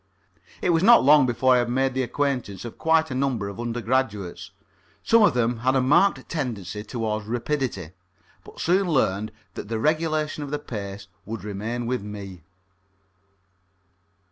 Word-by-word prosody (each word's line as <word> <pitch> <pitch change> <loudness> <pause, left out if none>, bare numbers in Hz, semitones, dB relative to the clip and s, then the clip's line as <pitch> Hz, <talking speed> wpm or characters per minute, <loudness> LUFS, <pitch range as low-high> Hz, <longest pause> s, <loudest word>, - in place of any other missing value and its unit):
It 180 - +3
was 165 -1 +2
not 235 +5 +7
long 145 -1 +6
before 125 +2 +3
I 125 - +4
had 120 0 -1
made 130 +1 +1
the 130 - 0
acquaintance 125 -7 -2
of 120 - -9
quite 160 -2 +2
a - - -2
number 130 -6 -1
of 100 - -9
undergraduates. 120 -4 -2 0.5
Some 230 0 +5
of 205 - +4
them 120 0 +1
had 130 +3 +1
a - - +4
marked 150 +10 +3
tendency 110 - -4
towards 110 -1 -3
rapidity, 120 - -2 0.5
but - - -14
soon 185 +3 +2
learned 110 - +1 0.2
that - - -7
the 115 +1 -2
regulation 155 +2 0
of 145 - -5
the 150 - -1
pace 100 -7 -7 0.2
would 110 -1 -6
remain 110 +4 -4
with 125 -1 -1
me. 100 -3 -8
120 Hz, 160 wpm, -24 LUFS, 105-145 Hz, 0.5 s, not